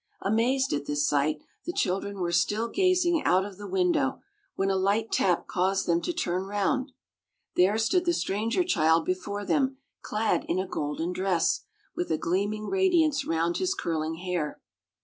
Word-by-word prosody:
Amazed 245 +6 +1
at 145 0 -2
this 145 0 +1
sight, 150 +1 +1 0.2
the 345 - -2
children 200 - -1
were 175 -1 -1
still 210 +7 +1
gazing 365 -2 +2
out 185 +2 +3
of 200 -1 -10
the 205 - -7
window, 345 -8 +1 0.3
when 195 0 +1
a - - +1
light 200 +4 +1
tap 180 -3 +2
caused 190 +1 0
them 170 0 +2
to - - -2
turn 185 - -2
round. 255 +7 0 0.6
There 190 +4 +4
stood 350 +11 +2
the 345 - +3
stranger 225 - 0
child 160 - +3
before 200 +3 -3
them 270 0 +1 0.2
clad 215 +1 0
in 170 - -1
a 190 - 0
golden 160 +2 -3
dress, 185 -3 +1 0.3
with 175 - -2
a 160 - +2
gleaming 205 +6 -1
radiance 345 - +2
round 165 +1 0
his 375 +1 0
curling 160 - -2
hair. 175 -3 -3
195 Hz, 170 wpm, -27 LUFS, 175-270 Hz, 0.6 s, There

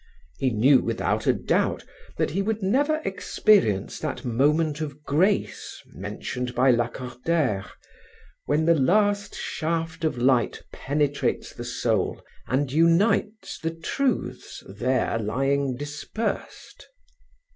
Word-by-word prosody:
He 130 - +2
knew 125 +4 +5
without - - -1
a - - +5
doubt - - 0 0.3
that - - 0
he 190 +6 0
would 215 +1 -2
never 290 +10 +1
experience 190 - +2
that - - -4
moment 150 +6 +1
of 150 -1 -6
grace 185 +9 0
mentioned 120 +6 -5
by 130 +2 +5
Lacordaire, 125 -1 -1 0.8
"when 150 +2 +2
the 170 - +5
last 205 +7 +2
shaft 165 0 -3
of 155 -5 0
light 125 -1 +2
penetrates 145 0 -1
the - - -7
soul - - -1 0.3
and 130 +1 0
unites 180 +7 +2
the 165 0 -3
truths 255 +10 -2
there 115 +4 0
lying 135 +4 0
dispersed." 150 - -5
145 Hz, 115 wpm, -25 LUFS, 125-175 Hz, 0.8 s, knew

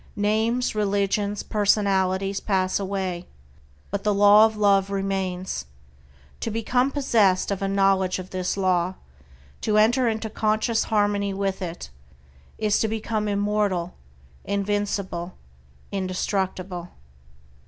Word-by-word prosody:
Names, 220 +4 +1
religions, 205 0 0
personalities 195 -2 +1
pass 190 -2 0
away, 190 -3 -3 0.6
but 200 - -3
the 210 -1 +1
Law 205 +2 +7
of 220 -1 -8
Love 200 -2 +3
remains. 190 - -2 0.7
To - - -3
become 245 +4 +1
possessed 220 -10 +2
of 200 - -2
a 195 - 0
knowledge 195 -1 +2
of 185 0 -8
this 185 +1 -2
Law, 185 -1 +1 0.7
to 210 -1 +1
enter 240 +4 +4
into 220 0 -1
conscious 220 +1 0
harmony 205 -2 +1
with 195 0 -2
it, 170 - -6 0.7
is 215 -1 +1
to 220 - +1
become 220 0 -2
immortal, 200 -3 0 0.5
invincible, 200 -3 -2 0.6
indestructible. 185 -2 -3
200 Hz, 110 wpm, -24 LUFS, 190-215 Hz, 0.7 s, Law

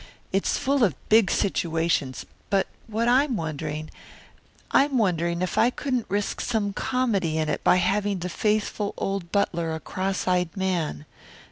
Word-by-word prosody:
It's 195 - +1
full 275 -1 +1
of 185 - +3
big 220 -3 +5
situations, 165 -7 0 0.2
but 195 -1 +2 0.2
what 225 +1 -1
I'm 260 +2 +3
wondering 155 -2 -4 0.8
I'm 275 -1 +4
wondering 170 -4 +1
if 185 - -1
I 240 - +5
couldn't 255 -2 -2
risk 205 +1 -1
some 210 -4 -1
comedy 200 -11 0
in 155 -1 0
it - - -2
by - - +5
having 195 +2 +1
the 180 0 -4
faithful 210 +1 -1
old 195 -3 -3
butler 170 -5 0
a - - -5
cross 190 +3 -3
eyed 180 0 +1
man. 170 - -1
195 Hz, 150 wpm, -25 LUFS, 170-215 Hz, 0.8 s, big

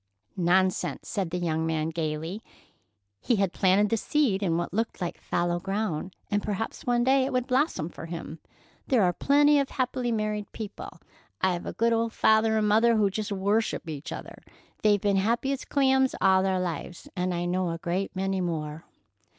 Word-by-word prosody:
"Nonsense!" 180 -3 +1
said 195 -6 -2
the 180 - -3
young 160 -2 -1
man 160 -1 -1
gayly. 160 +4 -3 0.8
He 240 - +1
had 195 -3 0
planted 195 +2 +3
the 225 - +1
seed 230 -5 +1
in 170 -4 +1
what 175 0 -3
looked 225 +3 -2
like 175 -3 -4
fallow 175 0 0
ground, 190 -2 -3 0.2
and 205 0 +2
perhaps 210 +2 -4
one 240 0 +3
day 265 +1 +4
it 270 - -2
would 250 -1 0
blossom 255 - +1
for 165 - -9
him. 165 -1 -7 0.5
"There 245 -6 +3
are 180 -1 +3
plenty 290 - +4
of 275 - 0
happy 255 -1 -1
married 215 -2 -2
people. 215 -3 -8 0.4
I've 180 -2 0
a - - -4
good 230 +1 +2
old 230 0 0
father 220 0 +3
and 215 -1 +2
mother 225 +3 +4
who 205 -2 +2
just 215 +2 -3
worship 200 0 0
each 155 0 -6
other. - - -8 0.4
They've 205 -1 +4
been 200 0 +1
happy 235 +7 +1
as 275 0 -3
clams 265 -2 +2
all 190 0 +4
their 190 -1 +1
lives, 175 0 -5
and 180 0 -1
I 175 0 -2
know 180 0 0
a 165 - -3
great 180 +4 -3
many 190 0 -1
more. 160 -3 -4
195 Hz, 185 wpm, -27 LUFS, 175-225 Hz, 0.8 s, day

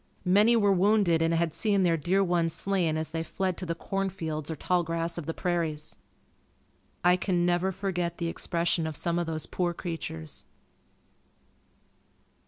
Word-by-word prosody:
Many 205 +6 +5
were 205 -3 +4
wounded 190 -3 +3
and 165 0 +2
had 165 -1 +1
seen 200 -3 +2
their 170 -2 +3
dear 180 +6 +2
ones 170 -3 +1
slain 180 -5 0
as 160 0 -3
they 165 0 -2
fled 185 +2 -2
to 180 - -6
the 165 - -1
corn 195 +3 -2
fields 160 -5 -4
or 160 - -2
tall 180 +3 +1
grass 165 +1 -1
of 160 - -8
the 165 - -1
prairies. 160 -4 -2 1.1
I 180 0 +6
can 180 -2 0
never 175 +2 +2
forget 180 -3 -2
the 170 - -3
expression 170 -1 0
of 155 -3 -3
some 170 0 0
of 175 - -2
those 160 -1 -3
poor 175 -2 -1
creatures. 160 - -5
175 Hz, 170 wpm, -28 LUFS, 165-190 Hz, 1.1 s, I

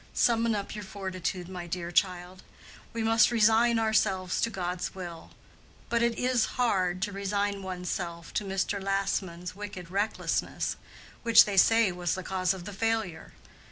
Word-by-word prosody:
Summon 230 -1 +3
up 200 -1 -4
your 210 0 -6
fortitude, 185 -2 -4
my 180 -2 -7
dear 175 0 -4
child; 180 0 0 0.5
we 230 -1 -3
must 225 0 +5
resign 230 +1 +4
ourselves 200 -5 +1
to 230 - +2
God's 180 -3 -3
will. 175 -3 -8 0.6
But 235 -1 +1
it 235 0 +1
is 250 -2 +2
hard 185 -7 +1
to 205 - -1
resign 200 0 -1
one's 180 -2 -4
self 170 -2 -5
to - - 0
Mr. 195 +1 -1
Lassman's 190 -3 -2
wicked 195 -4 -8
recklessness, 205 +3 -1 0.5
which 230 -1 +7
they 205 - -3
say 225 +1 +5
was 175 -1 -2
the 185 - -5
cause 185 -1 0
of 190 -2 -5
the 205 - -7
failure. 220 -5 -2
195 Hz, 160 wpm, -28 LUFS, 180-220 Hz, 0.6 s, which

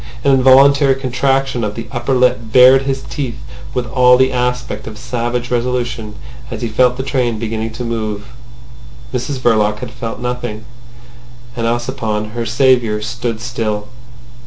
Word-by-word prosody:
An 140 - +4
involuntary 135 +1 +5
contraction 135 -1 0
of 105 0 -3
the 115 - -5
upper 130 +1 -1
lip 125 0 +3
bared 130 +2 +7
his 135 0 -3
teeth 125 -5 -5 0.4
with 125 -1 -1
all 125 0 +4
the 130 +1 +3
aspect 125 -3 -2
of 110 -1 -8
savage 120 +1 -3
resolution 120 -3 -2 0.3
as - - -6
he - - 0
felt 125 +2 +2
the 130 - -3
train 125 -4 0
beginning 110 0 -3
to 125 - -5
move. 110 -3 -3 0.9
Mrs 130 +3 -2
Verloc 110 -4 +2
heard 120 +3 -7
and - - -14
felt 115 -2 -6
nothing, 120 -3 -4 0.9
and 115 -2 -1
Ossipon, 115 -3 -2
her 115 0 -4
saviour, 120 -2 +2
stood 115 +1 -4
still. 110 -3 -3
120 Hz, 155 wpm, -16 LUFS, 115-130 Hz, 0.9 s, bared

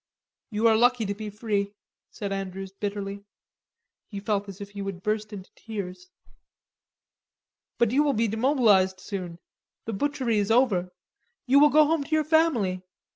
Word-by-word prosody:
"You 220 0 +2
are 225 - +5
lucky 240 0 +3
to 200 - -2
be 210 +1 -6
free," 205 -1 -2 0.3
said 200 -3 -6
Andrews 195 0 -5
bitterly. 200 0 -5 0.8
He 200 - -6
felt 205 0 -2
as 195 +1 -10
if 200 0 -8
he 200 -1 -7
would 195 -2 -6
burst 215 0 -1
into 195 -3 -9
tears. 210 - -7 1.7
"But 235 -2 +2
you 275 +4 +3
will 295 -2 +2
be 230 -1 +1
demobilized 220 -5 +3
soon; 185 -3 -6 0.5
the 225 - -4
butchery 250 -1 0
is 200 - -1
over. 215 -7 +2 0.5
You 270 +2 +5
will 295 +1 +7
go 305 +2 +6
home 315 -1 +1
to - - -14
your 310 - +2
family. 285 - +2
210 Hz, 160 wpm, -26 LUFS, 195-245 Hz, 1.7 s, will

